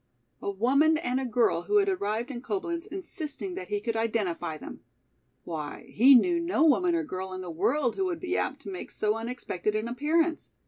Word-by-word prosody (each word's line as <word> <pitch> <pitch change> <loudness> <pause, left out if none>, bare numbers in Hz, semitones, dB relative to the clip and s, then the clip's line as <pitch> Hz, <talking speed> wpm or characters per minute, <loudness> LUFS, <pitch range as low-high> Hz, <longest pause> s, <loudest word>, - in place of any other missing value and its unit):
A - - -2
woman 275 +10 +3
and 255 -4 -1
a 265 - -2
girl 240 +1 +2
who 415 - +2
had 400 -1 +4
arrived 235 - -1
in 240 -2 -6
Coblenz 350 +1 -3
insisting 370 -2 -5
that 375 - -6
he 415 - -1
could 230 - -3
identify 195 -8 -1
them! - - -9 0.6
Why, 155 -3 -6
he 260 +5 +7
knew 340 +8 +4
no 335 -2 +1
woman 345 +3 +4
or 335 - 0
girl 190 -9 -5
in 185 - -5
the 180 -2 -6
world 245 - +1
who 385 - +1
would 350 -3 -2
be 365 +2 -2
apt 280 +2 -2
to 200 - -6
make 185 - -6
so 210 0 0
unexpected 225 -3 -3
an 215 +2 -1
appearance! 315 +6 0
265 Hz, 200 wpm, -28 LUFS, 215-340 Hz, 0.6 s, he